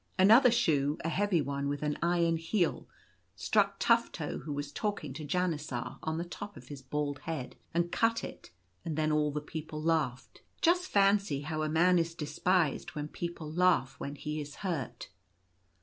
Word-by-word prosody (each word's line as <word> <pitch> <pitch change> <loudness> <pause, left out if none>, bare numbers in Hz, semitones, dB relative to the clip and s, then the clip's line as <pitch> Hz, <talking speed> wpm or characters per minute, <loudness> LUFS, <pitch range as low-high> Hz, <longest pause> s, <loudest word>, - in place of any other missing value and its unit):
Another 225 +7 +7
shoe 155 - +2
— - - -9
a - - +1
heavy 185 -2 +1
one 140 +1 -2
with 145 +1 -3
an 150 -1 0
iron 170 -1 +2
heel 165 +2 0 0.2
— - - -40
struck - - +2
Tufto, - - +1
who 150 - -6
was 145 0 -4
talking 205 +3 -3
to 155 - -7
Janisar 150 -6 -2
— - - -31
on 160 0 -2
the 170 - -1
top 205 +3 -8
of 125 - -13
his 140 -2 -8
bald 145 +1 -2
head, 160 -6 -5 0.2
and 170 +1 0
cut 230 0 +2
it, - - -8 0.3
and 160 -2 -3
then 155 0 +1
all 150 0 +2
the 150 +1 -3
people 155 0 -6
laughed. 155 -6 -1 0.2
Just 360 +2 +3
fancy 195 - +3
how 155 +1 -3
a 155 - 0
man 175 +3 +4
is 165 0 -1
despised 160 +1 0
when 150 0 -4
people 165 -2 -5
laugh 180 -6 +3
when 140 +1 -5
Jhe 150 +1 -4
is 145 0 -8
hurt. 135 -10 -3
160 Hz, 185 wpm, -31 LUFS, 145-180 Hz, 0.3 s, Another